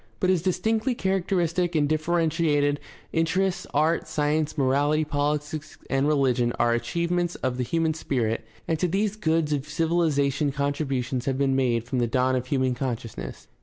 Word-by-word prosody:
But 185 - +3
as 180 -3 +2
dis 185 +1 0
tinctly 225 +4 0
characteristic 180 -2 0
and 150 -2 +3
differentiated 155 -2 +1 0.3
interests, 180 +3 0
art, 155 +3 +1
science, 155 0 0
morality, 145 +3 +2
politics, 150 +1 -2
and 135 +1 +2
rehgion 130 -5 +2
are 120 0 +3
achievements 170 +8 -1
of 130 -1 -2
the 125 - 0
human 160 +5 0
spirit, 120 -7 -1 0.2
and 160 -1 0
to 180 - +2
these 200 +4 0
goods 160 -6 +1
of 145 +1 -3
civilization 150 -3 +1
contributions 135 -3 -2
have 135 -1 0
been 135 -1 +2
made 120 -4 +1
from 120 +2 -2
the 120 - +2
dawn 130 +2 +1
of 125 0 -2
human 130 -2 +1
consciousness. 115 - -5
150 Hz, 160 wpm, -25 LUFS, 130-165 Hz, 0.3 s, But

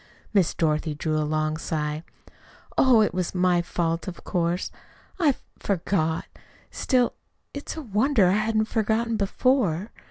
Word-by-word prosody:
Miss 195 -5 +3
Dorothy 155 -1 0
drew 155 +1 -1
a 150 -1 -1
long 155 0 0
sigh. 150 -1 -2 0.7
"Oh, 250 -4 +6
it 210 - 0
was 180 0 -2
my 180 -1 +3
fault, 170 0 -2
of 180 - -7
course. 175 0 -1 0.5
I 295 -7 +4 0.2
forgot. 165 -4 0 0.5
Still, 250 -3 +1 0.4
it's 285 +2 -6
a 315 - -5
wonder 220 0 +3
I 180 - +4
hadn't 215 +2 +2
forgotten 225 +1 0
before. 210 - +1
185 Hz, 135 wpm, -25 LUFS, 165-225 Hz, 0.7 s, Oh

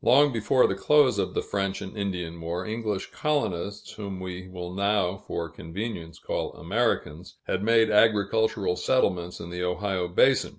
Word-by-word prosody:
Long 140 +3 +5
before 120 +3 +3
the - - +1
close 145 +6 +4
of - - -1
the - - 0
French 100 -1 -2
and 95 - -8
Indian 90 -5 -3
War, 85 +2 -3
English 110 -3 -3
colonists 105 - -2
whom 100 -3 -6
we 95 0 -6
will 90 -1 -7
now, 100 -1 +1
for 85 -3 -4
convenience, 85 +1 -6
call - - -3
Americans 115 +7 -1
had 90 - -1
made 115 0 +4
agricultural 105 -2 +3
settlements 90 -9 +1
in 85 - -7
the 90 0 -4
Ohio 90 0 -1
basin. 130 +9 +3
100 Hz, 160 wpm, -26 LUFS, 90-110 Hz, -, Long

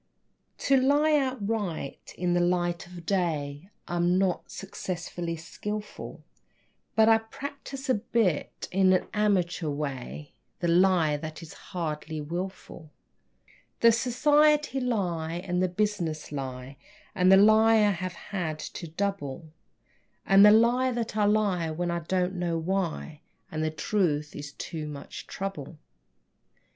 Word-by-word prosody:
To 275 - +3
lie 290 +4 +4
outright 220 - -2
in 175 0 0
the 175 - +3
light 175 -1 0
of 175 -1 -11
day 160 -3 -1 0.2
I'm 175 +1 +1
not 190 -2 0
sufficiently 175 -3 -5
skilful, 210 +6 -7 0.7
But 220 0 +5
I 225 0 +6
practice 275 +4 -8
a 260 - +4
bit, 205 -6 -1
in 185 0 +4
an 185 - +2
amateur 185 -6 +1
way, 145 0 -5 0.3
The 175 - 0
lie 170 -4 +4
which 155 +2 -7
is 160 - -10
hardly 160 -3 -5
wilful; 170 0 -6 0.9
The 230 - +7
society 295 +4 +3
lie 180 -10 -1
and 180 +1 -2
the 185 - +2
business 175 -6 -2
lie 135 -1 -6 0.4
And 185 0 +4
the 190 - +9
lie 220 +2 +6
I 210 -2 +4
have 185 -1 -4 0.2
had 165 -5 -2
to 165 +2 -7
double, 165 -4 -3 0.7
And 195 +1 +7
the 210 - +10
lie 240 +4 +4
that 235 -3 -3
I 210 -1 +3
lie 205 -5 +2
when 175 +2 -2
I 170 - -1
don't 180 +2 -1
know 175 -2 -1
why 165 -3 -2 0.3
And 155 0 -2
the 155 - +1
truth 155 -3 -1
is 145 -1 -7
too 160 -3 -6
much 145 -1 -8
trouble. 175 -6 -6
180 Hz, 135 wpm, -27 LUFS, 160-210 Hz, 0.9 s, the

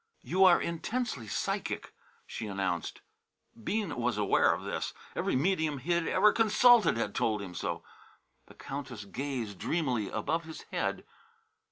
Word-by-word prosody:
"You 190 +2 +4
are 180 -2 +7
intensely 170 - -3
psychic," - - -3 0.3
she 110 - -6
announced. 95 -4 -2 0.6
Bean 205 - -1
was 120 -2 -1
aware 105 -2 +4
of - - -2
this. - - -3 0.2
Every - - 0
medium 155 0 +1
he 145 +7 -4
had 170 -1 +2
ever 210 +3 +5
consulted 225 - +5
had 105 -3 -1
told 110 -1 +1
him 95 -3 -7
so. 85 - -3 0.6
The - - -16
Countess 130 -6 -6
gazed 120 -4 -4
dreamily 130 - 0
above 165 0 -1
his 160 0 -9
head. - - -2
140 Hz, 145 wpm, -30 LUFS, 110-175 Hz, 0.6 s, are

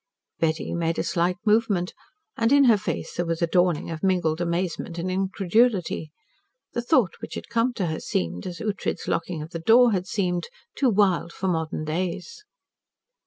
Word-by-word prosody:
Betty 160 0 0
made 165 -1 -1
a - - 0
slight 175 +1 0
movement, 210 -4 +2 0.4
and 230 +1 +1
in 285 0 +6
her 235 -5 +6
face 210 - -4
there 175 - -1
was 165 0 -1
a - - +6
dawning 175 -1 +1
of 160 - -5
mingled 175 -4 +1
amazement 170 -1 -2
and 180 +2 -2
incredulity. 195 -2 +1 0.6
The 240 - -1
thought 235 - +3
which - - -7
had - - -7
come 235 +2 +2
to 200 -6 -2
her 160 -1 -2
seemed 85 0 -2
as 180 -1 -6
Ughtred's 210 -4 -3
locking 165 -2 -2
of 160 - -10
the 165 - -4
door 235 +7 +6
had 185 -2 -1
seemed 180 -4 -1 0.3
too 270 - +2
wild 190 -5 +2
for 190 - -4
modern 160 -3 -1
days. 180 - -3
180 Hz, 175 wpm, -25 LUFS, 165-215 Hz, 0.6 s, in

